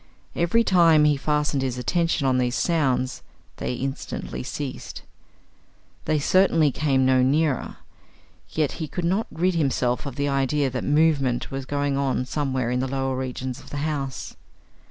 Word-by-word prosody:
Every 175 +8 +2
time 165 -6 +5
he 150 -1 +4
fastened 150 0 0
his 130 -2 -2
attention 165 +3 0
on 130 -1 +2
these 125 0 0
sounds, 135 -6 0 0.4
they 125 - -3
instantly 135 +2 -5
ceased. 130 +1 -6 1.0
They 155 0 +1
certainly 165 -1 +3
came 135 -2 +1
no 130 0 +4
nearer. 140 +1 +1 0.7
Yet 155 -3 0
he 155 - -2
could 170 +5 -4
not 195 +6 0
rid 180 +4 +1
himself 130 -5 0
of 135 - -6
the 140 +1 -1
idea 135 0 +1
that 125 - -3
movement 145 -5 +2
was 135 -1 -5
going 145 -1 -1
on 135 -2 0
somewhere 130 -3 -1
in 125 - 0
the 130 - -1
lower 135 0 -1
regions 130 0 -4
of - - -14
the 145 - -5
house. 140 -4 -4
140 Hz, 155 wpm, -24 LUFS, 130-155 Hz, 1.0 s, time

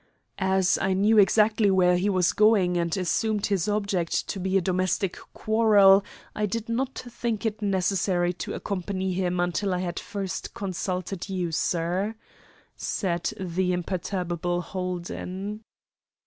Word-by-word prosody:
"As 190 -1 +2
I 190 0 +1
knew 210 +3 +4
exactly 210 +1 +4
where 180 -2 +4
he 185 +3 +1
was 185 -3 +2
going, 210 -5 +4
and 170 +1 0
assumed 205 +3 0
his 195 -4 0
object 200 -5 -1
to 195 - -3
be 190 +1 +1
a - - +4
domestic 185 +1 0 0.2
quarrel, 205 -3 +5 0.3
I 210 0 0
did 225 +3 -3
not 255 +3 -2
think 235 -2 -3
it 215 -1 -2
necessary 185 -2 +1
to - - -5
accompany 190 -1 -3
him 180 -1 -1
until 180 +2 0
I - - -2
had 175 -1 -3
first 200 0 -5
consulted 185 -2 -4
you, 180 -3 -2
sir," 180 +6 -1 0.6
said 175 -4 -2
the 180 0 -1
imperturbable 175 -1 -2
Holden. 185 +3 -5
190 Hz, 135 wpm, -26 LUFS, 180-205 Hz, 0.6 s, quarrel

